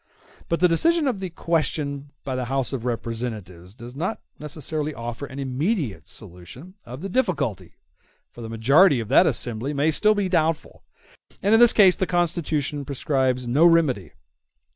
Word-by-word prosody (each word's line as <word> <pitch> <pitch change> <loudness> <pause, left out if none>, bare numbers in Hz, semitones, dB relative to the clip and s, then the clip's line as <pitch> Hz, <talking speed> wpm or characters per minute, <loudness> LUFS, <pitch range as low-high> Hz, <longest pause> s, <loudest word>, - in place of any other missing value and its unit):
But 170 - 0
the 180 - +6
decision 320 - +2
of 240 -7 -1
the 190 -1 -4
question 150 -4 -2
by 130 -2 -4
the 130 -1 -2
House 135 +1 -1
of 125 -3 -4
Representatives 110 -6 -5
does 120 +2 -11
not 180 +9 -3 0.2
necessarily 150 0 -4
offer 120 +4 -6
an 135 - -11
immediate 140 - -2
solution 95 - -11
of 125 +4 -8
the 195 - -4
difficulty, 170 - -2 0.6
for 120 - -12
the 115 - -7
majority 135 - +4
of 110 -2 -6
that 170 +7 +5
assembly 125 +1 -1
may 145 +3 +2
still 215 +7 +3
be 205 -2 0
doubtful, 165 -3 -1 0.6
and 205 +3 +3
in 225 - +6
this 240 -1 +8
case 190 -4 +5
the 190 - -2
Constitution 160 -5 -1
prescribes 130 -2 -1
no 135 +7 +2
remedy. 155 - +3
145 Hz, 165 wpm, -23 LUFS, 120-175 Hz, 0.6 s, this